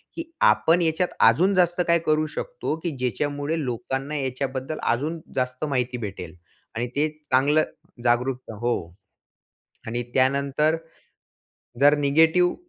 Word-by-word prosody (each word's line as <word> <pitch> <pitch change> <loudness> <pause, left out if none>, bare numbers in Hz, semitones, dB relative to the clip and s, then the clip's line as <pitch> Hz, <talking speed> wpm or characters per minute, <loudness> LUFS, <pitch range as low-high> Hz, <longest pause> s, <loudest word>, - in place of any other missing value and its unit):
की 330 - -4 0.3
आपण 170 +2 +3
याच्यात 165 +2 0
अजून 180 - +2
जास्त 175 -1 +3
काय 170 0 +4
करू 155 0 +2
शकतो? - - -3
की 170 - -1
ज्याच्यामुळे 145 +5 -1
लोकांना 135 +4 -3
याच्याबद्दल 130 +2 -3
अजून 150 +7 0 0.2
जास्त 125 +2 -1
माहिती 125 -3 -1
भेटेल 90 -4 -8 0.4
आणि 120 +2 -1
ते 150 +2 +2 0.2
चांगलं 145 +4 +4 0.4
जागरूक 125 +1 0
हो. 120 0 +1 1.1
आणि 120 +2 -2
त्यानंतर 140 +4 +2 1.0
जर 145 +1 +6
निगेटिव्ह 160 +5 +3
140 Hz, 120 wpm, -24 LUFS, 125-160 Hz, 1.1 s, जर